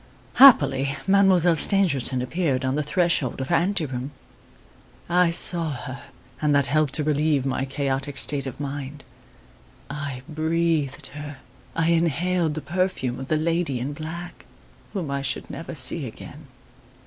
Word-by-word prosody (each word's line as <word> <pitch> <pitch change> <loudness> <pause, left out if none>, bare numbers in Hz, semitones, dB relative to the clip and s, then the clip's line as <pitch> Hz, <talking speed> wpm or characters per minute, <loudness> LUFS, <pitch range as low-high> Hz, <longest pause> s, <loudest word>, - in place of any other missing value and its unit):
"Happily, 140 - +6
Mademoiselle 190 -3 +4
Stangerson 145 - +3
appeared 135 -2 -1
on 130 - 0
the 150 - 0
threshold 155 -4 0
of 130 - -4
her - - +3
ante 180 -1 +1
room. 130 -1 -5 1.0
I 175 0 +3
saw 170 -1 +2
her, 130 0 -7 0.4
and 150 -1 +2
that 140 -1 +3
helped 145 +1 +1
to 155 - +1
relieve 150 -2 +1
my 135 0 -1
chaotic 135 0 -3
state 140 -2 +2
of 130 - -8
mind. 140 0 -6 0.9
I 140 -3 -5
breathed 160 -2 -1
her 145 -1 -8 0.4
I 165 0 +1
inhaled 170 0 0
the 155 - -4
perfume 155 -9 -2
of 135 - -7
the 155 - +1
lady 165 -3 -1
in 135 +4 -4
black, 165 +4 -8 0.5
whom 175 -9 -4
I 140 0 -2
should 140 - -5
never 165 0 -7
see 130 +1 +2
again. 145 +6 -12
150 Hz, 150 wpm, -24 LUFS, 135-170 Hz, 1.0 s, Happily